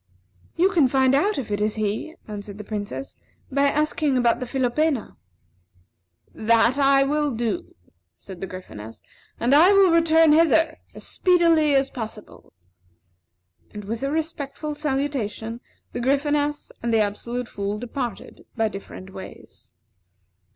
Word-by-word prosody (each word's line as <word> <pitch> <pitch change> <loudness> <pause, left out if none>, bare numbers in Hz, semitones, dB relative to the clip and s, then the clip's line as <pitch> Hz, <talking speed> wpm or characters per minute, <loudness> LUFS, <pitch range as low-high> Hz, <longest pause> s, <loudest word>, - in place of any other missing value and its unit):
"You 370 +3 +3
can 325 -8 +4
find 265 0 +3
out 400 +10 +2
if 245 -6 -4
it 205 0 -1
is 210 0 0
he," 215 +9 -3
answered 205 -1 -7
the 210 - -7
Princess, 205 - -6 0.4
"by 280 +1 +3
asking 300 -1 +1
about 240 -1 +2
the 250 - -5
philopena." 265 +1 0 1.2
"That 230 +3 +3 0.3
will 295 -1 0
I - - -5
do," 220 -5 -3 0.4
said 190 -3 -11
the 195 - -3
Gryphoness, 115 - -10 0.4
"and 245 +3 +2
I 340 +7 +7
will 390 -3 +6
return 325 -1 +5
hither 325 0 +3 0.2
as - - -9
speedily 335 -5 +3
as 270 0 +2
possible." 220 -3 -8 1.2
And, 210 -1 -8
with 225 +3 -4
a 275 - -1
respectful 305 -1 -3
salutation, 265 -6 -3 0.3
the - - -3
Gryphoness 290 +3 0
and 235 - -1
the 225 - +3
Absolute 235 +4 -3
Fool 200 -1 -4
departed 245 -1 -6
by 225 -1 +2
different 190 -1 -10
ways. 190 - -11
255 Hz, 135 wpm, -23 LUFS, 215-300 Hz, 1.2 s, I